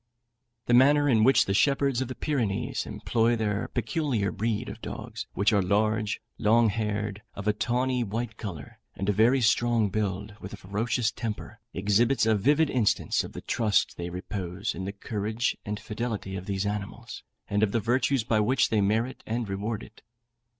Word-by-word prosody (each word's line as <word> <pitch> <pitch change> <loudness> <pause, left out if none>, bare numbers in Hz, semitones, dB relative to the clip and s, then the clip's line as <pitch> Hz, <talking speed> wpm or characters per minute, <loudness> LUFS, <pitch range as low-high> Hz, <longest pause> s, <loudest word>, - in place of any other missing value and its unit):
The 120 - +1
manner 145 +4 +6
in 115 -5 +4
which 135 +4 +5
the 95 - 0
shepherds 140 +2 +2
of 130 - -1
the 130 - -6
Pyrenees 120 -10 -1
employ 115 0 +1
their 105 -2 -1
peculiar 120 - -1
breed 110 +1 -2
of - - -8
dogs, - - -6
which 100 +3 +3
are 100 - +4
large, 105 +2 +1 0.2
long 115 +2 +4
haired, 105 -1 -2
of 100 +1 -6
a 105 - +4
tawny 125 +3 0
white 115 +1 -3
colour, 90 -11 -8 0.2
and 95 - -4
a - - +3
very 120 +6 +4
strong 115 -2 +3
build, 105 0 -2
with 95 - -8
a - - -6
ferocious 110 +5 -1
temper, 115 0 -5
exhibits 110 +7 +2
a 110 - +4
vivid 145 +9 +3
instance 120 -5 +1
of - - -9
the - - -7
trust 110 -4 +1
they 85 0 -4
repose 90 +2 -4
in 95 +2 -5
the 100 - -3
courage 110 +3 -2
and 105 +1 -3
fidelity 105 -3 -4
of 95 -1 -6
these 100 0 -1
animals, 105 -1 -5 0.3
and 100 0 0
of 110 -2 +3
the 115 - +1
virtues 125 +3 +1
by 110 0 +1
which 120 +5 +2
they 110 -2 +3
merit 110 +6 0
and 115 0 -2
reward 100 +3 -3
it. 110 - -15
110 Hz, 180 wpm, -27 LUFS, 100-120 Hz, 0.3 s, manner